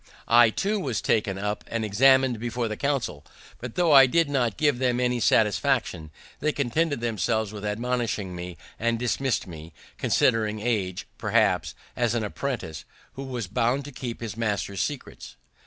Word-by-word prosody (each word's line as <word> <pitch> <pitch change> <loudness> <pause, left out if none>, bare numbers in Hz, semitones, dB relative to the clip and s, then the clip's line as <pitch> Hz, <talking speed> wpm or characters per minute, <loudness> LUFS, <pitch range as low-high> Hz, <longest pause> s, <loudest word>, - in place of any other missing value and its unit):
I 120 0 +6
too 205 - -1
was 130 - -2
taken 105 -3 0
up 105 +1 -3
and 115 -1 -2
examin'd 130 +3 +4
before 120 +1 -2
the 110 - -4
council; 135 - -2 0.4
but, 120 -1 -7
tho' 175 -3 +3
I 135 -2 +9
did 165 +2 +2
not 120 -6 0
give 145 -5 +2
them 125 -2 +1
any 125 -1 +1
satisfaction, 110 - +1 0.3
they 155 +2 +1
contented 145 +1 0
themselves 110 -1 -1
with 105 -1 -8
admonishing 110 -3 -2
me, 90 0 -7 0.2
and 115 +1 +1
dismissed 125 +2 -1
me, 80 -2 -10 0.3
considering 110 -3 +2
me, 105 -5 -1 0.2
perhaps, - - +1 0.2
as 120 -1 0
an 115 - 0
apprentice, 105 - -4 0.3
who 135 - -7
was 125 -4 -4
bound 120 +8 0
to 145 - -8
keep 125 -3 -6
his 110 -4 -5
master's 105 -4 -2
secrets. - - -5
115 Hz, 160 wpm, -26 LUFS, 105-130 Hz, 0.4 s, I